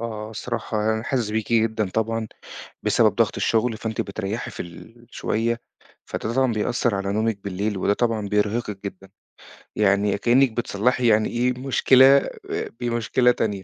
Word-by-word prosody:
آه، 110 Hz, -2 st, -5 dB
الصراحة 110 Hz, -1 st, -2 dB
أنا 110 Hz, -, -3 dB
حاسِس 120 Hz, -3 st, -1 dB
بيكِ 110 Hz, +1 st, -2 dB
جدًا 110 Hz, -2 st, +1 dB
طبعًا 110 Hz, +1 st, -1 dB, 0.6 s
بسبب -, -, +3 dB
ضغط -, -, +1 dB
الشُغل، 115 Hz, 0 st, +1 dB
فأنتِ 110 Hz, 0 st, -3 dB
بتريّحي 100 Hz, +3 st, -4 dB
في -, -, -6 dB
الشوية، 115 Hz, +4 st, -4 dB, 0.5 s
فده 110 Hz, -, -4 dB
طبعًا 130 Hz, -2 st, +2 dB
بيأثّر 115 Hz, 0 st, 0 dB
على 100 Hz, 0 st, -2 dB
نومِك 110 Hz, -1 st, -1 dB
بالليل 100 Hz, +1 st, -2 dB
وده 100 Hz, +2 st, +2 dB
طبعًا 110 Hz, -2 st, -1 dB
بيرهقِك 105 Hz, 0 st, -1 dB
جدًا. 95 Hz, -1 st, -8 dB, 0.7 s
يعني 100 Hz, 0 st, +2 dB
كإنِّك 125 Hz, +4 st, +3 dB
بتصلّحي 120 Hz, +2 st, 0 dB
يعني 110 Hz, -1 st, +3 dB
إيه، 125 Hz, +1 st, 0 dB
مشكلة 130 Hz, 0 st, +5 dB, 0.5 s
آآ -, -, -3 dB
بمشكلة 120 Hz, +1 st, +2 dB
تانية، 100 Hz, -5 st, -2 dB
110 Hz, 145 wpm, -23 LUFS, 105-120 Hz, 0.7 s, مشكلة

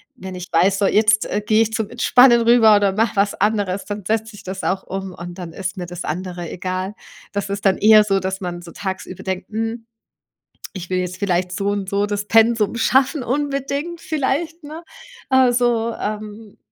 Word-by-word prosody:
wenn 190 Hz, -5 st, -8 dB
ich 180 Hz, 0 st, -8 dB
weiß, 190 Hz, +4 st, +3 dB
so, 205 Hz, -, +2 dB
jetzt 215 Hz, 0 st, +3 dB, 0.2 s
gehe 220 Hz, +1 st, +4 dB
ich 220 Hz, 0 st, -5 dB
zum 220 Hz, -2 st, -2 dB
Entspannen 245 Hz, 0 st, +5 dB
rüber 230 Hz, -2 st, +6 dB
oder 200 Hz, -2 st, +2 dB
mache 220 Hz, +1 st, 0 dB
was 200 Hz, 0 st, +2 dB
anderes, 205 Hz, -3 st, 0 dB
dann 205 Hz, -2 st, -6 dB
setze 220 Hz, +1 st, 0 dB
sich 205 Hz, -, -13 dB
das 190 Hz, 0 st, -6 dB
auch 190 Hz, 0 st, -1 dB
um 190 Hz, -1 st, -6 dB
und 175 Hz, 0 st, -8 dB
dann 175 Hz, -2 st, -7 dB
ist 190 Hz, 0 st, -5 dB
mir 175 Hz, -1 st, -5 dB
das 175 Hz, 0 st, -7 dB
andere 175 Hz, +1 st, -4 dB
egal. 185 Hz, +2 st, -4 dB, 0.4 s
Das 200 Hz, -1 st, -3 dB
ist 200 Hz, 0 st, -4 dB
dann 190 Hz, -, +4 dB
eher 215 Hz, 0 st, +7 dB
so, 195 Hz, -2 st, +1 dB
dass 190 Hz, 0 st, -3 dB
man 175 Hz, -2 st, -5 dB
so 170 Hz, -, -11 dB
tagsüber 190 Hz, -2 st, -6 dB
denkt: 190 Hz, 0 st, -4 dB
„Hm, 225 Hz, +1 st, -4 dB, 0.9 s
ich 180 Hz, -1 st, -7 dB
will 185 Hz, -, 0 dB
jetzt 180 Hz, 0 st, -3 dB
vielleicht 180 Hz, -2 st, 0 dB
so 200 Hz, +1 st, -1 dB
und 200 Hz, -2 st, -3 dB
so 200 Hz, +1 st, 0 dB
das 205 Hz, 0 st, -3 dB
Pensum 225 Hz, -1 st, +3 dB
schaffen 260 Hz, +3 st, +2 dB
unbedingt 285 Hz, +4 st, -2 dB
vielleicht, 315 Hz, +2 st, -2 dB
ne?“ 315 Hz, +3 st, -9 dB, 0.5 s
Äh, 260 Hz, -1 st, +5 dB
so, 235 Hz, -1 st, +1 dB
ähm 210 Hz, 0 st, -6 dB
205 Hz, 195 wpm, -20 LUFS, 190-230 Hz, 0.9 s, eher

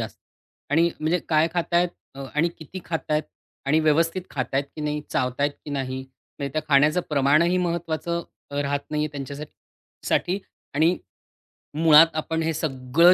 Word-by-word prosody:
जास्त -, -, -6 dB, 0.5 s
आणि 165 Hz, +3 st, +4 dB
म्हणजे 160 Hz, +3 st, +2 dB
काय 155 Hz, 0 st, +4 dB
खातायेत 175 Hz, 0 st, +2 dB, 0.3 s
अ, 135 Hz, 0 st, -6 dB
आणि 155 Hz, +3 st, +3 dB
किती 165 Hz, +4 st, -8 dB
खातायेत 155 Hz, -2 st, -1 dB, 0.4 s
आणि 155 Hz, +3 st, +4 dB
व्यवस्थित 165 Hz, +4 st, +2 dB
खातायत 135 Hz, +1 st, -1 dB
की -, -, -5 dB
नाही? 150 Hz, 0 st, -1 dB
चावतायत 130 Hz, +3 st, 0 dB
की 150 Hz, -, -7 dB
नाही? 130 Hz, -2 st, -2 dB, 0.4 s
म्हणजे 140 Hz, -1 st, -3 dB
त्या 155 Hz, -, -1 dB
खाण्याचं 150 Hz, +4 st, +5 dB
प्रमाणही 150 Hz, +5 st, +4 dB
महत्वाचं 170 Hz, -1 st, -1 dB, 0.3 s
अ, 145 Hz, 0 st, -1 dB
राहत 140 Hz, 0 st, -1 dB
नाहीये 150 Hz, 0 st, 0 dB
त्यांच्यासाठ 140 Hz, +1 st, -6 dB, 0.6 s
साठी. 185 Hz, +3 st, +1 dB, 0.4 s
आणि 160 Hz, +5 st, +3 dB, 0.8 s
मुळात 160 Hz, 0 st, +8 dB
आपण 160 Hz, +1 st, -1 dB
हे 165 Hz, 0 st, 0 dB
सगळं 155 Hz, +3 st, +4 dB
155 Hz, 145 wpm, -24 LUFS, 140-165 Hz, 0.8 s, मुळात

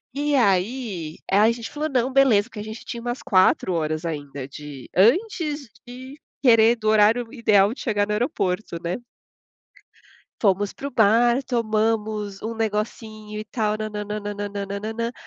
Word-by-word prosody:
E 290 Hz, 0 st, 0 dB
aí 195 Hz, -, 0 dB
aí 210 Hz, +3 st, +5 dB
a -, -, +3 dB
gente 230 Hz, -1 st, -6 dB
falou: 300 Hz, +1 st, -3 dB
"Não, 255 Hz, -1 st, 0 dB
beleza", 245 Hz, -5 st, +4 dB
porque 215 Hz, -, -9 dB
a -, -, -4 dB
gente 220 Hz, +2 st, -8 dB
tinha 235 Hz, -, -5 dB
umas 240 Hz, +1 st, -4 dB
4 185 Hz, -1 st, +3 dB
horas 155 Hz, 0 st, -2 dB
ainda, 145 Hz, -4 st, -5 dB
de 145 Hz, -2 st, -10 dB
antes 295 Hz, -, +2 dB, 0.2 s
de 260 Hz, +3 st, -10 dB, 0.3 s
querer 230 Hz, -2 st, +6 dB
do 215 Hz, -1 st, -4 dB
horário 220 Hz, +3 st, +4 dB
ideal 210 Hz, -3 st, +3 dB
de -, -, -10 dB
chegar 205 Hz, -4 st, 0 dB
no 210 Hz, -, -1 dB
aeroporto, 210 Hz, -, -1 dB
né. 170 Hz, +2 st, -2 dB, 1.5 s
Fomos 200 Hz, 0 st, +2 dB
para 280 Hz, -, -6 dB
o -, -, -11 dB
bar, 235 Hz, +4 st, +4 dB
tomamos 215 Hz, -3 st, -1 dB
um 225 Hz, +1 st, -4 dB
negocinho, 215 Hz, 0 st, -4 dB
e -, -, -6 dB
tal, 215 Hz, 0 st, -1 dB
nã-nã-nã-nã-nã-nã-nã. 210 Hz, +1 st, -4 dB
215 Hz, 150 wpm, -23 LUFS, 200-240 Hz, 1.5 s, querer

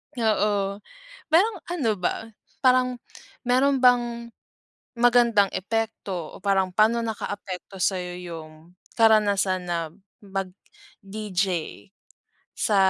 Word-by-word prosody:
Oo. 205 Hz, -3 st, +1 dB, 0.5 s
Parang 385 Hz, +8 st, +4 dB, 0.2 s
ano 285 Hz, -11 st, +1 dB
ba, 195 Hz, +3 st, -2 dB, 0.3 s
parang 255 Hz, -1 st, +3 dB, 0.5 s
meron 265 Hz, +3 st, +3 dB
bang 240 Hz, -2 st, +2 dB, 0.6 s
magandang 235 Hz, -4 st, +4 dB
epekto 200 Hz, -5 st, -3 dB
o -, -, -11 dB
parang 195 Hz, -2 st, +2 dB
pa'no 220 Hz, +5 st, +3 dB
nakaapekto 205 Hz, -4 st, -6 dB
sa'yo 180 Hz, -2 st, 0 dB
yung 165 Hz, 0 st, -10 dB, 0.2 s
karanasan 205 Hz, -4 st, +3 dB
na 175 Hz, -1 st, -1 dB, 0.4 s
mag-DJ? 200 Hz, -, -5 dB, 1.2 s
Sa 210 Hz, -, +1 dB
210 Hz, 90 wpm, -25 LUFS, 190-240 Hz, 1.2 s, Parang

